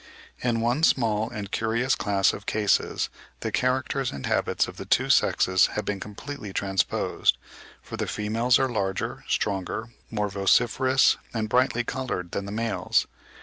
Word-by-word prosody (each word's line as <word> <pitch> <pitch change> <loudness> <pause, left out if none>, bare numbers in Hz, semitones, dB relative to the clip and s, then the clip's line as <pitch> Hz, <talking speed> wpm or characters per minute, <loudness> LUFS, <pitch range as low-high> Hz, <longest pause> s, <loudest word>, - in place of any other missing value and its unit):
In 120 -2 0
one 120 +6 +1
small 110 -8 +2
and 105 -4 -6
curious 115 +4 +1
class 100 -6 +2
of 100 - -9
cases 105 -2 +1 0.3
the - - -2
characters 130 +1 0
and 70 - -6
habits - - +1
of - - -10
the - - -7
two - - +2
sexes 95 0 +4
have 105 - -2
been 100 -1 -2
completely 105 +2 -7
transposed, 95 -1 +1 0.5
for - - -7
the - - -2
females 115 +4 +2
are 135 - +2
larger, 95 -6 -2
stronger, 100 +3 -2 0.2
more 105 -2 -1
vociferous 120 +7 +3 0.2
and 110 -1 -1
brighter 125 +1 +2
coloured 115 -9 -4
than 100 - -3
the 100 - -6
males. 115 0 0
110 Hz, 150 wpm, -26 LUFS, 100-125 Hz, 0.5 s, sexes